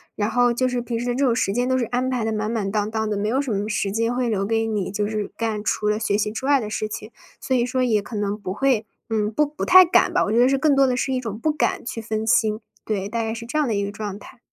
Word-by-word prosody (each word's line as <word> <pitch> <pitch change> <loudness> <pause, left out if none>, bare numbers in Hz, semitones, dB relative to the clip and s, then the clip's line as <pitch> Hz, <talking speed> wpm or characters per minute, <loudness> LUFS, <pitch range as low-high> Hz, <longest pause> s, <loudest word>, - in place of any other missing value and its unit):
然 210 +1 -1
后 245 0 +3
就 255 +2 +1
是 250 -1 -1
平 235 -1 -3
时 245 - -3
这 275 +3 +1
种 240 -3 +2
时 195 -5 0
间， 245 +3 0
都 260 - +2
是 245 - 0
安 250 +3 -1
排 250 -3 -1
得 225 - -1
满 215 0 -2
满 210 -4 -2
当 210 0 0
当 220 0 -2
的， 210 -1 -1
没 210 +1 -1
有 255 +4 +1
什 280 -4 -2
么 205 0 -1
时 205 -2 -1
间 230 +3 0
会 250 -1 0
留 195 -3 0
给 225 +1 0
你， 210 -4 -2
就 205 +1 -1
是 210 -1 -2
干 220 -2 -2
除 210 0 0
了 210 +1 0
学 205 -2 0
习 210 0 -1
之 245 +4 -5
外 285 -1 +5
的 220 - -4
事 215 0 -2
情。 215 +1 -7 0.3
所 260 - -1
以 240 - +2
说 255 +1 0
也 220 -4 +2
可 215 - -9
能 205 -1 -1
不 205 -3 -6
会 225 0 +1 0.2
嗯， 215 -1 0
不 300 +7 +2
不 295 +1 -6
太 370 0 +8
敢 345 - +3
吧， - - +2
我 210 - -2
觉 230 - +3
得 250 +2 +5
是 275 - +2
更 295 0 +3
多 275 -1 +5
的 250 - 0
是 265 - -1
一 255 - 0
种 220 -4 -5
不 310 +7 0
敢 300 -5 -1
去 230 - -4
分 220 0 -3
心。 220 -2 +2 0.2
对， 200 -3 -2
大 230 +2 -2
概 225 0 -2
是 230 +1 -6
这 305 +6 -2
样 300 - +1
的 225 - 0
一 200 0 0
个 200 - -4
状 205 -1 -5
态。 205 - -14
225 Hz, 340 characters per minute, -23 LUFS, 210-250 Hz, 0.3 s, 太